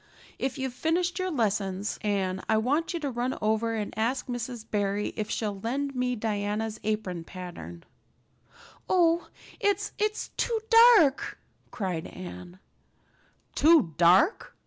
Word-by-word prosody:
If 265 +1 -2
you've 265 -2 -3
finished 350 +6 0
your 370 0 -1
lessons, 205 - -1
Anne, 190 -3 -1
I 220 - +4
want 285 +9 0
you 340 - -3
to 285 -2 -2
run 245 +2 -2
over 220 +1 0
and 210 -2 -3
ask 235 +4 -1
Mrs. 245 -2 -5
Barry 205 -1 -1
if 215 -1 -3
she'll 205 -3 -2
lend 275 +6 -2
me 250 -1 -1
Diana's 210 0 -2
apron 205 -6 -2
pattern." 165 - -9 1.1
"Oh 340 -2 +3 0.3
it's 405 -2 0
it's 425 0 -1
too 460 -2 0 0.4
dark," 290 -5 +2 0.3
cried 180 -6 -3
Anne. 180 0 -9 1.0
"Too 305 - +4
dark? 180 - +4
225 Hz, 130 wpm, -27 LUFS, 200-280 Hz, 1.1 s, I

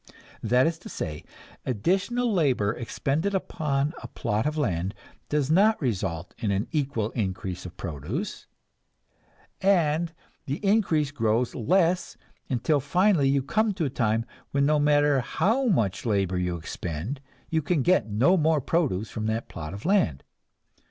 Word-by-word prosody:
That 125 +4 +3
is 165 0 -1
to - - -10
say, 75 -3 -5 0.4
additional 195 - 0
labor 130 - +2
expended 145 +10 -1
upon 150 -5 -1
a 120 - -7
plot 110 +1 -1
of 150 +1 -2
land 95 - -1 0.3
does 150 -1 +1
not 210 +6 +4
result 95 - -2
in 110 -3 -1
an 100 +1 0
equal 135 -8 -1
increase 95 -4 -3
of 90 - -13
produce, 90 - -5 1.1
and 170 -4 +2 0.4
the 140 - -1
increase 180 -9 +2
grows 115 -2 +1
less, 175 - +1 0.3
until 140 +4 +1
finally 175 0 +3
you 135 -1 +2
come 215 +7 +1
to 170 - -1
a 135 - -2
time 115 -2 0 0.2
when 140 0 +2
no 150 +1 +3
matter 145 -1 +4
how 220 - +1
much 110 - +1
labor 95 -5 +1
you 90 -1 -1
expend, 85 - -5 0.3
you 160 -1 +2
can 150 -1 +1
get 180 -9 +3
no 130 - +4
more 160 -1 +3
produce 130 - 0
from 110 0 -3
that 110 +1 -2
plot 75 -1 -6
of 100 +2 -8
land. 170 - +2
140 Hz, 150 wpm, -26 LUFS, 105-165 Hz, 1.1 s, not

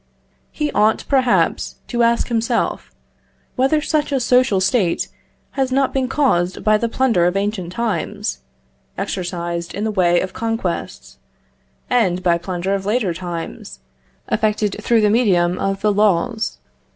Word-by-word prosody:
He 300 -1 -2
ought, 215 +1 +2
perhaps, 260 -3 +1
to 240 -1 0
ask 235 0 +2
himself, 230 -1 -1 0.7
whether 270 +4 +2
such 300 -1 0
a 275 - +1
social 250 -4 +3
state 190 -2 +1 0.4
has 265 -2 -1
not 270 0 +1
been 265 -1 0
caused 190 -11 +1
by 215 0 +3
the 235 - -1
plunder 225 -9 +2
of 180 +2 0
ancient 195 -3 -2
times, 200 - -2 0.6
exercised 170 -1 -4
in 205 - -3
the 220 - 0
way 175 -3 +3
of 185 0 -4
conquests; 185 - -4 0.7
and 185 -7 +1
by 170 -2 +2
plunder 185 +2 -3
of 195 0 -2
later 210 -5 +1
times, 165 - -6 0.5
effected 215 -2 0
through 230 +1 +3
the 210 -1 +3
medium 185 -6 +2
of 195 0 -1
the 210 -1 +2
laws? 215 +3 +1
210 Hz, 140 wpm, -19 LUFS, 180-240 Hz, 0.7 s, social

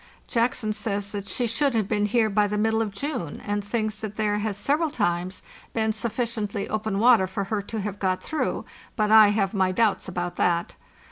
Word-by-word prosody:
Jackson 230 -2 0
says 200 -2 -2
that 200 -1 -5
she 245 - -1
should 240 +3 +1
have 215 -3 +1
been 210 -1 +1
here 225 +1 +3
by 210 0 +2
the 210 +1 -2
middle 220 +1 +2
of 220 - -1
June, 200 - -4
and 205 0 -1
thinks 215 0 -2
that 215 -1 -6
there 210 -1 0
has 210 -1 -2
several 295 +10 +1
times 185 -6 -1 0.3
been 220 -1 +1
sufficiently 220 -2 -2
open 215 -2 -2
water 225 -3 +5
for 195 +2 -3
her 205 +1 -2
to 215 +2 -5
have 205 0 -5
got 185 -1 0
through; 315 - -2 0.3
but 215 -2 +1
I 220 -1 +9
have 205 -1 +1
my 190 -2 +2
doubts 215 +2 +1
about 175 -1 -4
that. 170 -1 +1
210 Hz, 200 wpm, -25 LUFS, 200-225 Hz, 0.3 s, I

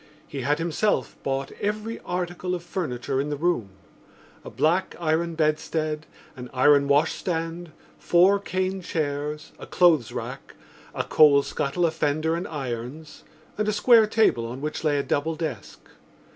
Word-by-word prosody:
He 140 - -5
had 145 +4 +1
himself 170 +6 0
bought 135 0 -2
every 215 +2 -2
article 180 0 -3
of 175 - -7
furniture 135 -7 -2
in 145 - -3
the 145 - -2
room: 155 - 0 0.7
a - - -8
black 175 +5 +1
iron 165 0 0
bedstead, 155 0 -1 0.3
an 125 -2 -8
iron 140 +2 +5
washstand, 165 +3 0 0.3
four 185 +3 +4
cane 185 -1 -2
chairs, 150 -2 -3
a - - -9
clothes 160 -10 +3
rack, - - -7 0.4
a - - -1
coal 145 -2 +5
scuttle, 155 +7 -1
a 165 - +2
fender 155 +1 0
and 170 - -4
irons 135 +1 -6 0.4
and 215 - 0
a - - +2
square 225 +1 +5
table 210 - +2
on 125 +3 -6
which 150 +2 -4
lay 150 -2 +2
a 140 - 0
double 160 +3 -1
desk. 150 - -5
155 Hz, 150 wpm, -25 LUFS, 145-175 Hz, 0.7 s, iron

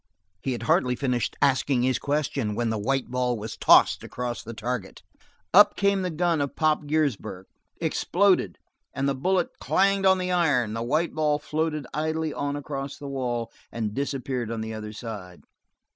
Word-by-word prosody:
He 135 - -1
had 120 - -5
hardly 125 +1 +2
finished 125 -2 -1
asking 135 -2 +2
his 130 -1 +1
question 140 -7 -1
when 115 -1 0
a - - -1
white 135 +5 -1
ball 125 -1 0
was 110 +1 -6
tossed - - +5
across 120 -1 -4
the 115 0 -8
target. 110 -2 -4 0.5
Up 205 +3 +7
came 200 -1 +2
the 185 - -1
gun 170 -1 +1
of 140 - -3
Pop 155 -1 +1
Giersberg, 140 -11 -1 0.3
exploded, 185 - +2 0.4
and 135 +1 0
the 140 - +2
bullet 180 +7 0
clanged 195 0 +2
on 190 0 +5
the 180 0 -2
iron; 145 -11 +2
the 115 - -3
white 155 +8 0
ball 150 -2 +1
floated 155 -1 -2
idly 155 0 -1
on 145 0 -2
across 140 -1 -5
the 145 - -8
wall 120 -4 -3 0.2
and 110 -3 -3
disappeared 130 -3 -2
on 115 -1 -3
the 110 0 -4
other 105 -1 -6
side. 105 -5 -8
135 Hz, 175 wpm, -26 LUFS, 120-155 Hz, 0.5 s, Up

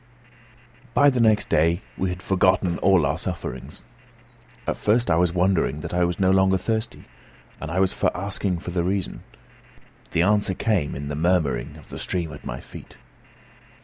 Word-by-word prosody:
By 145 0 +6
the 130 - -1
next 110 -2 +3
day 85 +6 +2
we 95 - -1
had 90 +1 -6
forgotten 95 -2 +2
all 95 -5 +4
our 70 +4 -1
sufferings. 85 -10 -6 0.8
At - - -1
first, 115 0 +2
I - - +4
was 90 0 +2
wondering 85 -5 +1
that - - -6
I 90 0 +2
was 85 -1 -2
no 95 -1 +3
longer 95 0 +4
thirsty, 110 +4 -2 0.6
and 80 - -5
I 90 +3 -1
was 95 -1 +2
for - - +1
asking 95 -1 -2
for 90 - -6
the 85 -1 0
reason. 95 +1 -2 0.9
The 85 - +2
answer 105 -1 +2
came 100 -10 0
in 70 +1 -5
the 75 - -3
murmuring 80 -6 0
of - - -16
the - - -7
stream 85 -4 -2
at 70 - -10
my - - -5
feet. - - -12
90 Hz, 180 wpm, -24 LUFS, 85-95 Hz, 0.9 s, By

